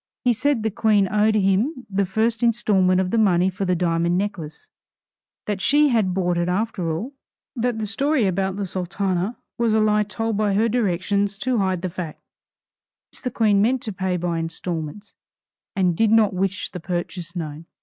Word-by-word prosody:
He 245 -1 +4
said 255 0 0
the 220 - 0
Queen 210 -2 +2
owed 215 +1 +3
him 215 +8 +1
the 200 -1 0
first 220 +4 0
instalment 205 -6 +3
of 185 -1 0
the 230 - +2
money 190 -3 +3
for 195 +2 -3
the 180 -1 +1
diamond 170 0 +1
necklace; 170 -7 -4 0.8
that 205 -2 -3
she 295 +5 +4
had 220 -7 +2
bought 180 -2 0
it 175 +1 0
after 185 -3 -1
all; 215 - -4 0.4
that 245 -1 -1
the 220 - -2
story 265 +4 +1
about 190 0 0
the 200 0 -3
Sultana 190 +3 -2 0.2
was 230 -2 +2
a - - +4
lie 210 0 +3
told 220 +1 -2
by 205 -2 +1
her 220 +3 +3
directions 200 -2 0
to 250 +1 0
hide 185 -2 0
the - - 0
fact; 170 -3 -6 0.9
since - - -4
the 255 - -2
Queen 215 -4 +2
meant 245 +4 +1
to 215 - -4
pay 185 -1 -1
by 170 -1 -2
instalments, 165 +3 -5 0.6
and 180 -3 +2
did 225 +4 +3
not 215 -2 +4
wish 195 +2 -2
the 180 - -6
purchase 175 0 -4
known. 160 -1 -6
200 Hz, 185 wpm, -22 LUFS, 180-220 Hz, 0.9 s, He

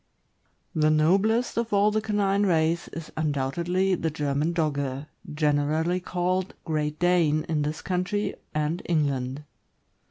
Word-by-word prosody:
>HE 155 -1 +3
noblest 200 +11 +2
of 235 -1 -1
all 205 +1 +4
the 215 +1 +1
canine 205 -2 +1
race 165 -1 +1
is 165 -1 -8
undoubtedly 160 +6 0
the 165 -2 0
German 150 +1 -1
Dogge, 140 -4 -1 0.3
generally 150 +3 +1
called 185 +1 -1
Great 150 -2 -1
Dane 170 -3 +3
in 155 -2 -1
this 150 +1 -3
country 195 +2 -1 0.2
and 155 +3 -1
England. 140 -4 -1
160 Hz, 125 wpm, -26 LUFS, 150-185 Hz, 0.3 s, all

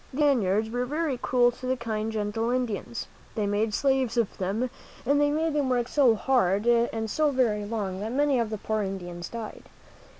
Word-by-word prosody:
These 270 - -6
Spaniards 220 -6 +2
were 245 +1 -1
very 300 0 -1
cruel 245 0 +3
to 255 +1 -8
the 260 0 +1
kind, 220 -2 -3
gentle 220 +1 -1
Indians. 240 -2 -2 0.3
They 215 - 0
made 205 +2 0
slaves 265 0 +1
of 230 -4 +1
them, 210 +7 -1 0.3
and 285 +3 +3
they 290 - +4
made 315 +1 0
them 290 -3 +1
work 245 -1 +1
so 285 +1 +2
very 225 -2 +5
hard 205 -6 +2
and 235 -2 +2
so 305 +7 +1
very 230 -6 +1
long 205 -4 -3
that 215 +3 -4
many 280 0 +2
of 230 -2 0
the 215 - -3
poor 215 +1 -1
Indians 175 -3 -5
died. 230 -2 -7
235 Hz, 200 wpm, -27 LUFS, 210-260 Hz, 0.3 s, very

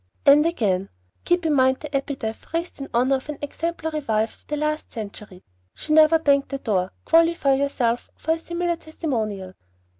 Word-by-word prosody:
And 295 +3 +7
again: 195 - 0 0.4
"Keep 350 -1 +2
in 310 - +2
mind 260 -1 +3
the 300 -2 -6
epitaph 265 -5 -4
raised 335 -3 -3
in 275 - -5
honor 255 +3 +3
of 265 - -12
an 300 - -4
exemplary 320 +1 -3
wife 220 -5 -1
of - - -31
the 300 - -2
last 305 +1 -2
century, 205 -4 -8 0.3
'She 305 - -3
never 315 +1 +7
banged 280 -3 +2
the 275 - -3
door.' 195 -8 -1
Qualify 330 -4 +4
yourself 260 -4 0
for 320 - -2
a 325 - +1
similar 340 +1 -2
testimonial." 220 - -4
280 Hz, 175 wpm, -23 LUFS, 230-320 Hz, 0.4 s, And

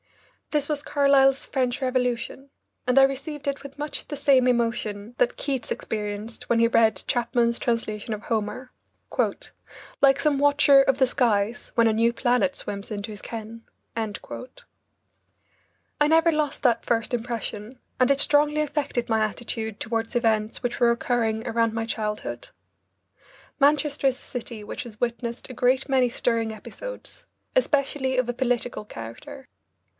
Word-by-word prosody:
This 295 -2 0
was 295 -1 -2
Carlyle's 275 -2 +4
"French 255 0 -1
Revolution," 255 +1 -1 0.4
and 250 +2 +4
I - - +8
received 275 +2 -1
it 280 0 -2
with 280 0 -10
much 295 +1 -3
the 290 - -5
same 270 -3 +4
emotion 230 -3 -1
that 245 - +1
Keats 270 -4 -3
experienced 210 +1 -4
when 235 - +3
he 230 - +5
read 230 -1 +3
Chapman's 235 -1 +1
translation 225 -2 -2
of 210 0 -6
Homer 230 +3 -3 0.6
"... - - -16
like 275 0 +5
some 295 -3 +2
watcher 285 -1 +6
of 270 -1 +2
the 265 - +5
skies, 230 -3 0
When 230 -1 +5
a 220 - +3
new 230 +2 +3
planet 245 +3 +1
swims 200 +2 -6
into 210 +1 -4
his 205 - -9
ken." 225 0 -7 0.3
I 225 -2 -1 2.0
never 325 +2 +5
lost 305 -3 -1
that 235 -3 +3
first 230 +1 0
impression, 235 0 -4 0.2
and 255 - +4
it 280 - +2
strongly 295 +1 +3
affected 285 -5 -2
my 220 -1 +1
attitude 220 0 -4
toward 225 +1 -2
events 220 -1 +1
which 245 0 -2
were 235 -1 +5
occurring 235 -2 0
around 230 -1 +1
my 225 0 -2
childhood. 220 - -4 1.1
Manchester 285 0 +3
is 260 0 0
a - - -14
city 235 -3 -6
which 210 - -5
has 225 -3 -11
witnessed 235 +1 -3
a - - -6
great 255 +2 +2
many 260 -3 +3
stirring 230 -1 0
episodes, - - -8 0.3
especially 275 - +1
of 255 -1 +2
a 245 - -1
political 245 -2 -1
character. 210 - -9
245 Hz, 150 wpm, -25 LUFS, 225-275 Hz, 2.0 s, I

